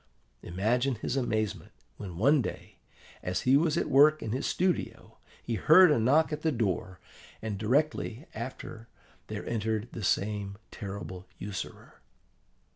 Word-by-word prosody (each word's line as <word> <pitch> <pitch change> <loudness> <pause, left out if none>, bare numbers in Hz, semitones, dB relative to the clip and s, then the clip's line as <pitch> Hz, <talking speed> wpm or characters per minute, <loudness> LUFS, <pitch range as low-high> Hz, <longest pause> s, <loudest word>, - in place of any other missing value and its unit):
Imagine 120 +9 0
his 115 +3 -3
amazement 110 - -2 0.2
when 90 -5 -7
one 140 - +4
day, - - -7 0.4
as 90 0 -2
he 130 +2 +4
was 155 +2 +3
at - - 0
work 150 +3 +5
in 110 - -3
his 130 +4 -1
studio, 180 0 -2 0.2
he 120 - -3
heard 160 - +7
a 145 - +3
knock 150 +7 +3
at 150 - -4
the 160 - +1
door, 95 - -2 0.4
and 110 -2 -4
directly 135 +2 0
after 115 -1 -7 0.4
there - - -5
entered 110 0 -1
that 115 - -6
same 100 0 -1
terrible 95 -3 -7
usurer. 100 -2 -7
115 Hz, 140 wpm, -29 LUFS, 105-140 Hz, 0.4 s, heard